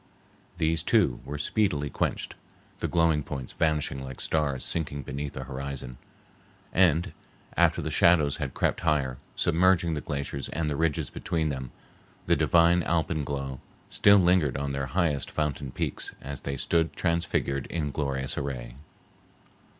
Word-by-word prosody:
These, 80 -1 +1
too, 90 - +2
were 75 - -5
speedily 75 - 0
quenched, - - -2 0.5
the - - -1
glowing 80 -3 +3
points 70 -3 -6
vanishing 75 -4 0
like 65 -1 -8
stars 70 -5 0
sinking 70 -4 -2
beneath 70 +2 -5
the 65 - -5
horizon. 65 -1 -5 0.7
And 85 -2 +3 0.4
after - - +3
the - - -3
shadows 80 -5 +4
had 70 -4 -4
crept - - +1
higher, 65 -4 0 0.2
submerging 85 0 +3
the 75 - -2
glaciers 70 -2 -4
and 80 0 -2
the - - -1
ridges 80 -2 0
between 80 -2 -1
them, 65 -3 -4 0.6
the - - +4
divine 85 +1 +4
alpenglow 70 -5 -1 0.3
still 100 0 +6
lingered 90 -8 +3
on 70 0 -2
their 70 -1 -2
highest 75 -1 0
fountain 70 -3 -2
peaks - - -3
as 70 0 -7
they 70 0 -3
stood 80 +4 +1
transfigured 85 -5 0
in 75 -4 -2
glorious 70 -3 -2
array. 60 -3 -5
75 Hz, 140 wpm, -27 LUFS, 70-80 Hz, 0.7 s, still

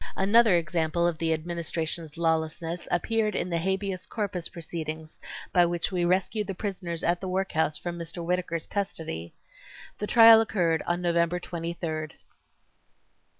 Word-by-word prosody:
Another 210 +1 +5
example 170 0 +1
of 170 -2 0
the 165 -1 +1
Administration's 165 -1 -3
lawlessness 165 +1 -1
appeared 215 +3 +1
in 180 - -2
the 170 - +1
habeas 190 0 -2
corpus 200 -5 -2
proceedings 160 -2 -6 0.3
by 175 - +6
which 175 +2 0
we 180 -2 0
rescued 190 +4 +1
the 195 - -4
prisoners 180 -4 -4
at 175 +1 +1
the 190 - -4
workhouse 180 -5 0
from 175 +2 -5
Mr. 170 +1 -6
Whittakers 175 -2 -1
custody. 160 - -4 0.6
The 210 - -2
trial 225 -1 +9
occurred 175 -7 +1
on 175 +1 0
November 170 0 +1
23rd. 165 -2 -4
175 Hz, 140 wpm, -27 LUFS, 165-190 Hz, 0.6 s, trial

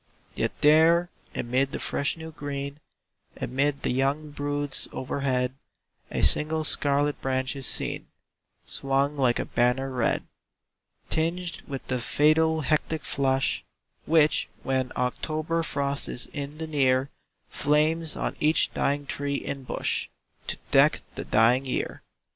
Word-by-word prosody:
Yet - - -2
there 165 +4 +5 0.2
amid 130 +3 0
the - - -1
fresh 140 +3 -1
new 160 0 -8
green, 140 -1 -5 0.6
Amid 140 +3 -1
the - - +1
young 140 +4 0
broods 145 -1 -2
overhead, 130 -1 -1 0.6
A - - -2
single 155 +1 +2
scarlet 145 -1 +1
branch 130 0 -1
is 135 -2 -3
seen, - - -1 0.6
Swung 140 +1 +1
like 130 -4 +2
a - - -1
banner 125 +3 +1
red; 125 -3 0 0.9
Tinged 165 +1 -1
with 135 -2 -5
the 125 -2 -2
fatal 160 +4 +3
hectic 155 +1 0
flush 135 -1 +1 0.4
Which, 155 -1 +4
when 130 -1 0
October 155 +6 -1
frost 140 -3 -1
is 125 - -1
in 145 0 -5
the 160 - -4
near, 135 -3 +2 0.4
Flames 155 +2 +1
on - - -2
each 155 +2 +3
dying 145 +1 0
tree 140 0 -3
and 135 -2 -5
bush, - - -1 0.4
To - - -3
deck - - +5
the - - -6
dying 120 +5 +4
year. 125 - -2
140 Hz, 130 wpm, -27 LUFS, 135-155 Hz, 0.9 s, there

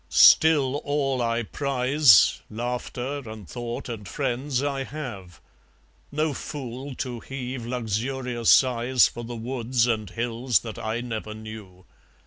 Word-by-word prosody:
Still 145 -4 +6
all 140 -3 -1
I 115 0 0
prize, 135 -2 +4
Laughter 125 +4 -4
and 110 -4 -9
thought 120 -1 -5
and 110 -5 -6
friends, 135 +2 -2
I 140 -2 -1
have; 120 - -8 0.7
No 150 +1 0
fool 135 -1 -6
to 125 -2 -4
heave 125 -1 -6
luxurious 120 +1 -2
sighs 125 -1 +5
For 120 - -8
the 120 +1 -6
woods 120 0 0
and 110 -5 -1
hills 115 +2 0
that 110 -2 -7
I 110 +2 -2
never 110 -3 -5
knew. 110 -4 -10
120 Hz, 125 wpm, -25 LUFS, 115-135 Hz, 0.7 s, Still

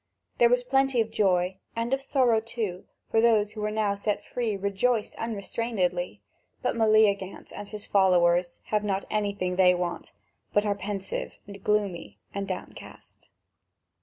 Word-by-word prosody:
There 235 - +6
was 245 0 +3
plenty 270 0 +2
of 220 -1 +1
joy, 185 -2 +2 0.2
and 230 +3 -1
of 270 - +1
sorrow 255 -5 +3
too; 220 -5 -4 0.3
those 225 -2 +4
who 215 -1 -7
were 210 - 0
now 210 -1 +1
set 200 +1 -2
free 230 -5 -2
rejoiced 205 +4 0
unrestrainedly; 200 - -2 0.4
but 250 - 0
Meleagant 215 -4 +2
and 205 - -7
his 210 0 -7
followers 175 -2 +3
have 210 -1 0
not 195 -1 -1
anything 200 -4 -1
they 180 -1 +6
want, 175 -1 -4 0.4
but 205 +1 +3
are 205 - +2
pensive, 200 -1 -4 0.3
gloomy, 205 -5 -1 0.2
and 200 0 -3
downcast. 185 -1 -9
205 Hz, 140 wpm, -27 LUFS, 190-225 Hz, 0.4 s, There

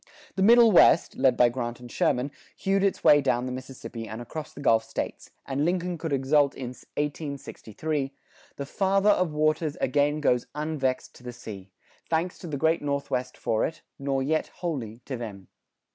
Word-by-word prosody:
The 190 - -1
Middle 230 +2 +7
West, 170 -2 +5
led 130 -2 +3
by 120 - +6
Grant 120 -1 -4
and 120 -1 -11
Sherman, 125 +3 +1 0.3
hewed 195 0 +1
its 200 -2 0
way 145 0 +7
down 125 -2 +1
the 130 - -3
Mississippi 125 -3 -7
and 110 - -6
across 150 +6 -7
the - - -12
Gulf 115 -5 +3
States, - - -5 0.2
and 140 +1 -1
Lincoln 175 0 -1
could 160 -1 -4
exult 140 +1 +3
in 130 -2 -5
1863, 140 0 -4 0.4
"The 140 - -5
Father 195 +6 +2
of 185 -5 +1
Waters 155 0 +1
again 145 +3 +1
goes 125 -5 +1
unvexed 150 -4 -2
to - - -17
the 125 - -6
sea. 100 -5 -9 0.4
Thanks 170 +2 -1
to 175 - -8
the 150 -3 -3
great 160 +4 +2
Northwest 140 -3 -2
for 110 - 0
it, 160 - -3 0.2
nor 135 -1 0
yet 155 +3 0
wholly 125 -10 -5
to 130 - -4
them." 100 -5 -8
140 Hz, 175 wpm, -27 LUFS, 125-160 Hz, 0.4 s, Middle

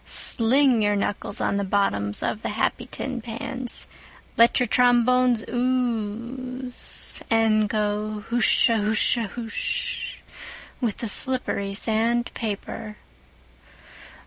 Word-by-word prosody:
Sling 250 +1 +4
your 205 0 +1
knuckles 200 0 -3
on 200 - 0
the 200 - -1
bottoms 185 - -1
of 215 - -2
the - - -3
happy 240 +3 -2
tin 260 -3 -5
pans, 240 +2 -2 0.5
let 230 +3 +5
your 250 - +2
trombones 245 0 +3
ooze, 250 +1 -2
and 220 -2 +2
go 210 0 -2
hushahusha 225 -1 +2
hush 225 +2 -4 0.6
with 230 -5 -1
the 230 - -4
slippery 205 -4 +2
sand 230 +3 +1
paper. 210 -1 -6
225 Hz, 100 wpm, -24 LUFS, 210-245 Hz, 0.6 s, let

